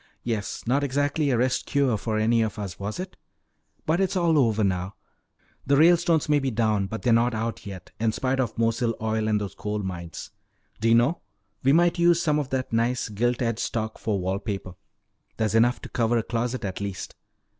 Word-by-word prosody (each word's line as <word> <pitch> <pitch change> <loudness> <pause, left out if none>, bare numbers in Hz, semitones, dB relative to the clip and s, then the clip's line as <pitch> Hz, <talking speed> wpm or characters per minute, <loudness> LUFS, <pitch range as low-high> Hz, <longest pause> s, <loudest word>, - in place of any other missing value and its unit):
Yes, 110 -4 -3
not 135 +5 +1
exactly 145 +2 0
a 125 - +2
rest 125 +2 0
cure 140 -5 +2
for 110 +1 -2
any 115 +2 +3
of 110 -1 -2
us, 100 -5 -6
was 100 - -4
it? 185 0 -6 0.7
But 165 +4 +1
it's 190 0 0
all 165 -3 +3
over 110 -4 +2
now. 95 0 -1 0.7
The 140 0 +4
Ralestones 165 0 +4
may 150 -1 +3
be 135 -1 -1
down 110 -4 +1
but 110 +3 -6
they're 120 - +3
not 115 +1 +3
out, 115 0 -4
yet, 95 -3 -9
in 110 0 +2
spite 130 +3 -1
of 120 -4 -1
Mosile 115 0 +1
Oil 110 0 -1
and 105 -1 +2
those 100 -2 -5
coal 105 +1 -4
mines. 85 -4 -6 0.5
D'you 115 +1 +4
know, 120 +9 +2 0.4
we 135 - +3
might 175 +2 +3
use 170 0 +5
some 150 -3 +1
of 140 -3 -3
that 130 -3 -3
nice 120 +1 0
gilt 120 +4 0
edged 115 -1 -1
stock 110 -1 -3
for 105 -2 -1
wall 95 +2 -1
paper. 100 -3 -5 0.6
There's 110 -2 0
enough 120 +2 +3
to - - -9
cover 120 0 +1
a 115 - 0
closet 120 +1 -2
at 95 0 -4
least. 100 -2 -5
115 Hz, 200 wpm, -25 LUFS, 105-135 Hz, 0.7 s, use